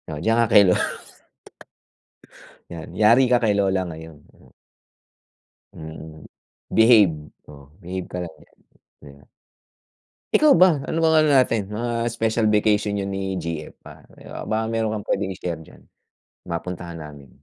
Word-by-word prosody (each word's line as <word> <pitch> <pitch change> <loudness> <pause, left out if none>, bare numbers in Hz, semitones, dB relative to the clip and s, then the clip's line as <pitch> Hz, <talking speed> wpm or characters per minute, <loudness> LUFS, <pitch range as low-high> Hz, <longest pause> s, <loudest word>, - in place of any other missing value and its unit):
Oh 75 - -5
diyan 115 +1 +2
ka 115 - +3
kay 105 - +8
lo 90 - +4 2.0
Yan, 85 -2 -9
yari 115 +5 +4
ka 120 - +4
kay 110 -3 +2
lola 95 -2 +1
ngayon. 80 -2 -11 1.5
Mm, 80 0 -11 0.5
behave, 110 -7 +5 0.3
oh, 70 -1 -15
behave 90 0 -6
ka - - -5
lang 85 -2 -6
diyan - - -31 0.5
di 70 - -12
ba. - - -21 1.1
Ikaw 305 -1 +5
ba? 175 -4 +5
Ano 165 +1 -1
bang 160 0 +4
ano 155 - +3
natin 115 -6 +2
mga 115 +2 -3
special 115 -1 0
vacation 105 -1 +1
niyo 100 - -2
ni 95 -1 -4
GF, 80 -3 -6
ah, - - -13 0.5
baka 110 +1 -1
meron 110 -1 -1
kang 105 - -7
pwedeng 95 -1 -2
i-share 85 -3 -5
diyan. 80 - -17 0.7
Mapuntahan 85 0 -6
namin. 75 -3 -11
100 Hz, 140 wpm, -22 LUFS, 85-115 Hz, 2.0 s, kay